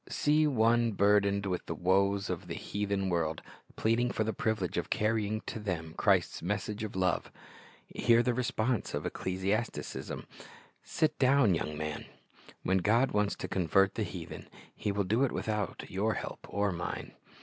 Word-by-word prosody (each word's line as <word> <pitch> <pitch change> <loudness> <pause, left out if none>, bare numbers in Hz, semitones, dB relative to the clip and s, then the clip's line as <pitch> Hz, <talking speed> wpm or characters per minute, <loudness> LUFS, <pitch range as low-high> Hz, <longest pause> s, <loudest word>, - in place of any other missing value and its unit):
See 150 +1 +3
one 115 -3 +3
burdened 100 0 +3
with 90 -2 -2
the - - -3
w^oes 100 +2 +2
of - - -5
the - - -4
heathen 100 -1 -2
world, 80 -3 -1 0.3
pleading 115 +2 +2
for 110 - 0
the 110 +1 -1
privilege 110 -4 -1
of - - -2
carrying 110 0 0
to - - -6
them 85 -6 -3
Christ's - - +2
message 105 +4 -2
of 105 - -5
love. 95 -2 0 0.5
Hear 120 0 +3
the 125 - +1
response 120 -1 -1
of - - -3
ecclesiasticism: 95 +5 -2 0.6
"Sit 155 -1 0
dow'n, 130 -6 +5
young 75 -2 -2
man. 75 0 -4 0.6
When 95 +1 +2
God 115 +8 +3
wants 105 -1 +1
to - - -5
convert 95 +2 +2
the - - -3
heathen, - - -6 0.3
He 105 - -2
will 100 0 0
do 110 +8 +2
it 135 - +2
without 105 -3 -2
your 105 +4 0
help - - -6
or 100 +1 +1
mine." 85 -1 -5
105 Hz, 160 wpm, -31 LUFS, 95-115 Hz, 0.6 s, dow'n